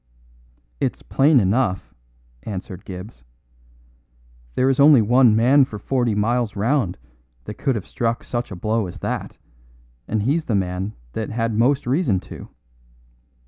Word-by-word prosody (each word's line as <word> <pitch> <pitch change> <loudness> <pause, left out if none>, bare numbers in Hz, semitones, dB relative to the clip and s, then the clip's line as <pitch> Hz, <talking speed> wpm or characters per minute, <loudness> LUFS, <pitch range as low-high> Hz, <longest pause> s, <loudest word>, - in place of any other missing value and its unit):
"It's - - -2
plain 140 0 +4
enough," 100 -1 0 0.5
answered 95 -2 -7
Gibbs. 90 - -9 1.3
"There 130 - +2
is 135 0 +1
only 140 -1 +7
one 120 +1 +4
man 130 +5 +5
for 110 -5 -5
forty 120 0 0
miles 115 +1 0
round 110 -2 0 0.5
that - - -9
could 135 - 0
have 105 - -4
struck 115 0 -2
such 120 -2 -4
a 100 - -7
blow 110 +3 -1
as 90 - -9
that, - - -4 0.7
and 110 -2 -1
he's 150 +7 0
the 110 - 0
man 95 +2 -2 0.2
that 110 - -3
had 115 0 -1
most 130 +6 +2
reason 125 - +1
to." - - -10
115 Hz, 145 wpm, -21 LUFS, 100-130 Hz, 1.3 s, only